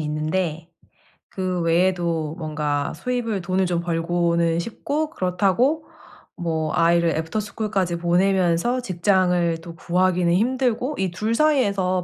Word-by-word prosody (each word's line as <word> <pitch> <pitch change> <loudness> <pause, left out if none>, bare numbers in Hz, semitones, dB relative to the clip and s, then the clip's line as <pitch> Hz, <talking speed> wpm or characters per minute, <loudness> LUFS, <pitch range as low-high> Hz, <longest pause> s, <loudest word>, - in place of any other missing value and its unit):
있는데 155 +2 -2 0.6
그 185 -2 -2
외에도 170 -2 +1
뭔가 150 -3 -2
수입을 240 -5 -2
돈을 185 +2 0
좀 175 -1 0
벌고는 170 0 0
싶고 285 - -3
그렇다고 200 - +1 0.5
뭐 160 -3 -2
아이를 170 0 +3
애프터스쿨까지 195 +2 -2
보내면서 180 +6 +2
직장을 180 -4 +1
또 165 0 -10
구하기는 180 0 +1
힘들고. 250 +5 0
이 190 -1 0
2 215 +6 -1
사이에서 200 -11 +2
180 Hz, 275 characters per minute, -22 LUFS, 170-205 Hz, 0.6 s, 아이를